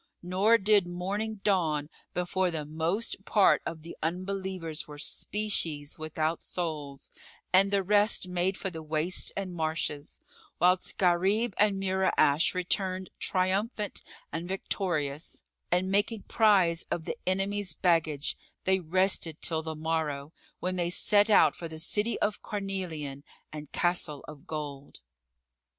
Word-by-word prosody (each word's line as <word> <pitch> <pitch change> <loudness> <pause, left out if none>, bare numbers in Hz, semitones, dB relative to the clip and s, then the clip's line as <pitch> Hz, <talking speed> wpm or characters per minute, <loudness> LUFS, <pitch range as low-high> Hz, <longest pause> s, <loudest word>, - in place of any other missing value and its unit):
Nor 195 +6 +4
did 205 -3 +3
morning 200 +4 -3
dawn 160 -7 +1 0.3
before 180 +1 +1
the 160 -3 -3
most 165 +8 -2
part 205 -1 +4
of 160 -2 -6
the 170 - -9
unbelievers 185 -1 -3
were 150 -1 -9
species 160 -5 -2
without 155 +1 -2
souls 150 -6 -5 0.4
and 195 +2 +6
the 200 -1 +1
rest 205 0 +3
made 180 +1 0
for 190 - -3
the 160 -2 -7
wastes 155 +3 0
and 190 -2 -3
marshes, 155 -3 -2 0.4
whilst 180 +2 +2
Gharib 195 +5 +2
and 205 -2 +3
Mura'ash 190 -5 +2
returned 185 +1 -1
triumphant 200 +3 0 0.3
and 165 +2 -4
victorious; 170 -6 -2 0.3
and, 180 +2 +2
making 205 +2 +1
prize 190 -7 +3
of 160 - -2
the - - -3
enemy's 195 -2 0
baggage, 160 -5 +1 0.3
they 190 0 +3
rested 180 -2 +1
till 160 -1 0
the 160 0 -5
morrow, 155 -2 -2 0.3
when 185 0 -2
they 175 -1 +1
set 205 +4 +4
out 210 - +6
for 170 - -6
the 160 -1 -8
City 210 +8 +1
of 210 0 0
Carnelian 180 -9 -4 0.3
and 150 -2 -8
Castle 175 -5 0
of 150 -2 -12
Gold. 145 -3 -6
180 Hz, 135 wpm, -29 LUFS, 160-195 Hz, 0.4 s, and